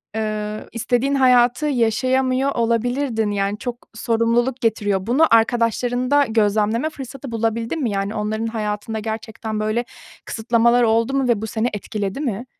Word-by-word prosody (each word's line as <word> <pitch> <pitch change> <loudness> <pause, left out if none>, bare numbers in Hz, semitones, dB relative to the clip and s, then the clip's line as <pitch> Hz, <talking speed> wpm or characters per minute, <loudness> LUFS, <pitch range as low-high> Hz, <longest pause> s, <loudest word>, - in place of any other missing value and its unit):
eee, 215 -1 -3
istediğin 245 +4 0
hayatı 250 +1 +4
yaşayamıyor 260 +2 +1
olabilirdin, 235 -1 0
yani, 200 0 -1
çok 245 0 -4 0.2
sorumluluk 235 +3 0
getiriyor. 205 -4 +1
Bunu 270 +7 +4
arkadaşlarında 245 +4 +2
gözlemleme 220 +4 +1
fırsatı 270 -2 -8
bulabildin 230 +6 -1
mi? 235 - 0
Yani, 200 +2 -2
onların 220 +1 -2
hayatında 215 0 -3
gerçekten 220 0 -5
böyle 215 +3 -1 0.4
kısıtlamalar 235 +2 +2
oldu 230 +3 +2
mu 270 -2 +1
ve 235 -4 +1
bu 220 - -3
seni 220 +2 -1
etkiledi 205 +1 -4
mi? 240 -4 -3
230 Hz, 135 wpm, -21 LUFS, 215-250 Hz, 0.4 s, hayatı